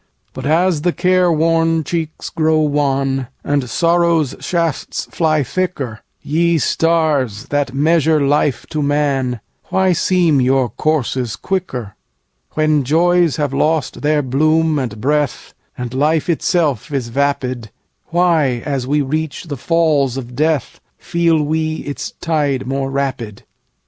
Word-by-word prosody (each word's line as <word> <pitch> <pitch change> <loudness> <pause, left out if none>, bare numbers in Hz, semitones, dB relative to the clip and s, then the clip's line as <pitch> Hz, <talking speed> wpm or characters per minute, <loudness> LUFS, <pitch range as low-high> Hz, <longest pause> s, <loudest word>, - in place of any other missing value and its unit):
But 130 +1 -5
as 165 0 +2
the 175 +2 +1
care 180 0 +2
worn 165 0 +2
cheeks 160 -1 -4
grow 160 0 +2
wan, 135 -3 0 0.2
And 140 -3 -1
sorrow's 170 0 +2
shafts 165 -4 -2
fly 155 -3 +1
thicker, 135 -7 -3 0.2
Ye 170 +2 +1
Stars, 150 -9 +1
that 145 -2 -1
measure 160 +1 +3
life 140 -3 +1
to 155 -2 -1
man, 140 -5 0 0.2
Why 190 -1 +2
seem 170 -5 +2
your 130 -1 +2
courses 130 -2 -1
quicker? 135 - -4 0.6
When 155 -2 +2
joys 170 +3 +3
have 145 -3 -2
lost 150 -1 0
their 150 0 +1
bloom 155 +4 +2
and 115 -5 -4
breathAnd 135 -2 -3
life 155 +5 +1
itself 155 - 0
is 130 -4 -2
vapid, 130 -3 -1 0.4
Why, 160 -8 +1
as 135 -4 -2
we 145 +1 +1
reach 155 +1 -3
the 155 -5 -5
Falls 145 -3 +1
of 125 -2 -7
Death, 155 -2 0 0.2
Feel 165 -2 +1
we 155 +1 -1
its 145 - -5
tide 145 -5 0
more 135 +1 -2
rapid? 130 -6 -3
150 Hz, 130 wpm, -17 LUFS, 135-165 Hz, 0.6 s, measure